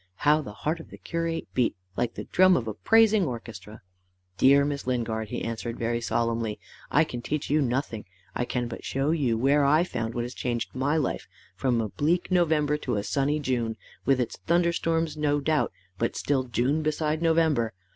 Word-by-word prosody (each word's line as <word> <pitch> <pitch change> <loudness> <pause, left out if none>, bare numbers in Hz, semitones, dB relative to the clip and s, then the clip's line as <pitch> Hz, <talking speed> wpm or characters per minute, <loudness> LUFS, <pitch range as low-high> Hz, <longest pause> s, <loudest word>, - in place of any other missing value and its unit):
How 150 +5 +3
the 130 - -8
heart 155 +10 -2
of 165 - -11
the - - -11
curate 165 0 -3
beat 125 -4 +1 0.2
like 120 -1 -1
the - - -5
drum 185 0 +4
of 115 - -3
a 110 - -2
praising 220 - +4
orchestra! 110 - -7 0.5
"Dear 140 +4 +5
Miss 140 -2 -3
Lingard," 115 -3 -1
he - - -4
answered, 115 0 -4
very 115 0 -1
solemnly, 115 -2 -1 0.3
"I - - +4
can 120 - -5
teach 150 +3 -3
you 150 +1 +3
nothing; 125 -4 -2 0.3
I 120 - -1
can 120 -1 -2
but 115 - -8
show 135 +3 0
you 135 -8 +1
where 140 +5 +3
I 150 +4 +4
found 115 -9 -4
what 120 - -1
has 120 +1 -6
changed 120 -3 -3
my 140 +4 0
life 150 - -2 0.3
from 125 -3 +1
a 110 -2 -1
bleak 170 - 0
November 155 -4 +2
to 130 -5 -2
a 100 - -1
sunny 145 +5 0
June 120 -5 -1 0.3
with 135 -1 +3
its 120 -2 -2
thunder 170 0 +3
storms 165 -2 -1
no 145 -1 +1
doubt 155 +1 +1 0.3
but 115 - 0
still 135 -3 0
June 130 +5 0
beside 155 0 -1
November. 160 -8 +2
135 Hz, 195 wpm, -27 LUFS, 115-155 Hz, 0.5 s, Dear